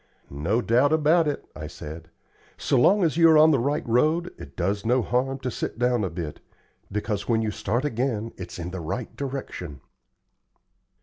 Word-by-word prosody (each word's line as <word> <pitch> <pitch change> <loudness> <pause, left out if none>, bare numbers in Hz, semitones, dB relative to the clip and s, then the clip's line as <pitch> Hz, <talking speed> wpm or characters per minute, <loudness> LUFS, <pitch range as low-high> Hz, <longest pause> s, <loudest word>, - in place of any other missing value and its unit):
"No 85 - 0
doubt 125 +5 +3
about 160 +1 +4
it," 145 - -3
I 75 0 -6
said. 80 +2 -9 0.5
"So - - 0
long 195 +10 +5
as 160 -2 +1
you 165 -1 +7
are 160 - +7
on 155 +1 +7
the 140 - +3
right 145 +5 -1
road, 155 +9 +2
it 70 0 -12
does 100 +3 -1
no 125 +2 +2
harm 130 +3 0
to 130 -1 -2
sit - - -4
down 120 -2 +1
a 95 - -1
bit, 80 -3 -6 0.5
because 105 +1 -3
when 115 -1 +2
you 110 - -1
start 115 +7 -1
again 115 -4 -1
it's 90 -2 -8
in 90 0 -5
the 95 -1 -5
right 110 +9 -5
direction." 130 - -5
120 Hz, 185 wpm, -25 LUFS, 95-140 Hz, 0.5 s, you